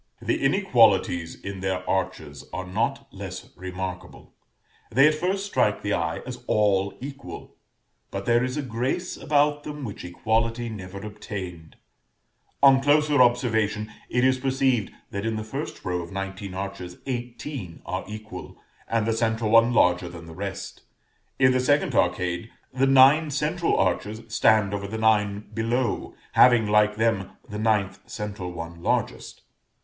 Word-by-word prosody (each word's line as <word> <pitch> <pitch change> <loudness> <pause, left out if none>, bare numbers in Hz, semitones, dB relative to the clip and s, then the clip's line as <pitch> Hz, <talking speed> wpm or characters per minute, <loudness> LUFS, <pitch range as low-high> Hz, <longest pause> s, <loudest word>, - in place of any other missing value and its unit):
The - - -1
inequalities 115 - +3
in 100 -1 -6
their 95 -1 -2
arches - - -2
are 95 - -4
not 90 - -1
less - - -8
remarkable: 90 0 -7 0.6
they 135 +5 +6
at 155 - +3
first 185 +5 -1
strike 105 - +1
the 100 - 0
eye 80 0 -1
as 125 -1 -7
all 100 -2 +2
equal; 140 +1 -8 0.6
but 100 0 -5
there 120 0 +3
is 130 +2 -2
a 150 - -1
grace 130 +9 -2
about 145 0 +1
them 150 -1 -6
which 105 - -7
equality 115 +6 -1
never 100 -3 -7
obtained: 95 -6 -7 0.9
on 135 -1 +7
closer 145 0 +4
observation, 110 -4 +2 0.2
it 125 +1 +2
is 130 0 +3
perceived 130 -4 +1 0.2
that 100 0 -3
in 110 0 -1
the 110 - -3
first 135 +5 -6
row 90 -2 -1
of 85 - -9
nineteen 95 0 -5
arches, 95 -2 -6
eighteen 120 - -5
are 95 +1 -3
equal, 110 -3 -8 0.3
and 115 -2 +1
the 115 - +1
central 110 -1 0
one 115 +1 +6
larger 90 -5 +3
than 85 -1 -10
the 80 - -10
rest; 100 +1 -6 0.6
in 130 0 +5
the 130 - +2
second 145 +3 +2
arcade, 90 +4 0 0.2
the 130 +1 +2
nine 135 +4 +6
central 150 +5 0
arches 105 +4 0
stand 110 -2 +3
over 100 0 -3
the 110 +3 -5
nine 105 -2 +2
below, 115 +3 -1 0.2
having, 120 -3 +6
like 105 0 +3
them, 110 -4 +1 0.2
the 105 0 -6
ninth 105 -4 +1
central 100 -4 -5
one 85 -1 -7
largest. - - -2
110 Hz, 150 wpm, -25 LUFS, 95-130 Hz, 0.9 s, on